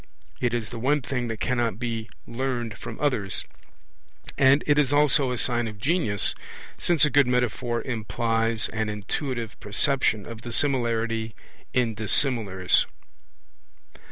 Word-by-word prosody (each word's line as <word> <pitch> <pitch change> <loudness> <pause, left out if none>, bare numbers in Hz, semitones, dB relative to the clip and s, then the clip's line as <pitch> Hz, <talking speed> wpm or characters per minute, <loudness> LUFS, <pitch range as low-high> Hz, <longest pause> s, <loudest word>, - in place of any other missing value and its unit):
It 125 - 0
is 115 -2 -3
the 120 - -6
one 140 +3 +1
thing 125 -2 -2
that 115 -2 -5
cannot 120 -5 0
be 115 -2 -4 0.2
learnt 120 -2 -3
from - - -8
others; 125 -10 0 0.9
and 140 +1 +4
it 145 0 +3
is 140 -3 +2
also 145 -2 +4
a 125 - -2
sign 120 -1 +1
of 105 -1 -8
genius, 125 - +1 0.4
since 165 -5 +3
a 150 - 0
good 140 -3 +4
metaphor 120 -1 0
implies 115 -1 -1
an 110 -1 -2
intuitive 115 +3 -4
perception 110 0 +1
of 115 -1 -9
the 120 - -7
similarity 115 -4 0 0.4
in 120 -3 +1
dissimilars. 105 -4 +2
120 Hz, 135 wpm, -25 LUFS, 110-130 Hz, 0.9 s, and